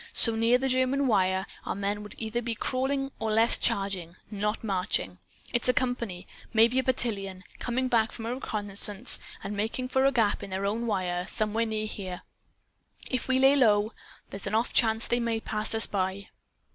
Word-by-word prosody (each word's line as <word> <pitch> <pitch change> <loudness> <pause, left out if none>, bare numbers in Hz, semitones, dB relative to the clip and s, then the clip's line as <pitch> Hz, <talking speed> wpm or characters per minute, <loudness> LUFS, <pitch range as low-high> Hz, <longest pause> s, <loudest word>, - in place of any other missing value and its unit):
So 230 - +7
near 230 +2 +3
the 265 +1 -1
German 260 +2 +1
wire, 190 -5 +1 0.2
our - - -4
men 200 +1 -2
would 210 - -10
either 230 +1 -3
be 230 -1 -3
crawling 270 +3 -2
or 220 -1 -1
else 230 +1 +5
charging, 190 -4 -2 0.2
not 210 +2 -2
marching! 180 - -2 0.3
It's 240 +1 +2
a 250 - +3
company 235 -8 -2 0.3
maybe 230 +3 +4
a - - 0
battalion 200 -8 -1 0.2
coming 255 +1 -1
back 230 -3 +2
from 225 - -7
a 235 - -2
reconnaissance, 205 -2 +3 0.2
and 200 +2 -5
making 225 +5 -3
for 265 +1 +2
a 275 - +4
gap 225 -5 +1
in 200 - -7
their 190 +1 -3
own 225 +4 -2
wire 180 -3 -2
some 215 -1 0
where 230 +1 0
near 215 -1 -2
here. 190 -4 -6 0.9
If 255 -2 -2
we 260 0 +2
lay 270 +2 +5
low 215 -4 +3 0.4
there's 195 +1 -3
an 205 - -1
off 230 +2 0
chance 225 -1 +3
they 240 - 0
may 230 -1 -1
pass 215 0 -1
us 225 - +7
by." 190 0 -3
220 Hz, 190 wpm, -27 LUFS, 200-245 Hz, 0.9 s, So